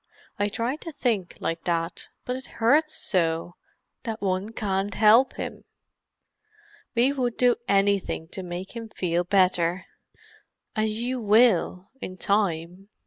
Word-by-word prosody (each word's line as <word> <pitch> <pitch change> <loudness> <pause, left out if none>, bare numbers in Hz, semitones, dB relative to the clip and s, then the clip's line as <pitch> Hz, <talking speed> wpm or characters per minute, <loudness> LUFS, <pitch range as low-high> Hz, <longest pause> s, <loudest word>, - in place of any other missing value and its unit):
"I 205 - +2
tried 235 +8 -2
to 330 - -6
think 235 - -1
like 165 0 -3
that—but 170 +8 -3
it 260 +1 -7
hurts 300 +7 +3
so, 165 -2 0 0.5
that 225 -3 -4
one 190 +2 -1
can't 200 -2 -2
help 225 +5 +6
him. - - -6 1.3
We 250 +4 +4
would 250 -4 -1
do 245 -1 +4
anything 195 -5 +1
to 190 - -6
make 180 +4 -6
him 230 -1 -6
feel 175 -4 -1
better." 180 -1 +2 0.9
"And 215 0 +1
you 240 +4 -2
will, 210 -4 +3
in 185 - -6
time. 185 -1 -1
200 Hz, 130 wpm, -26 LUFS, 180-235 Hz, 1.3 s, help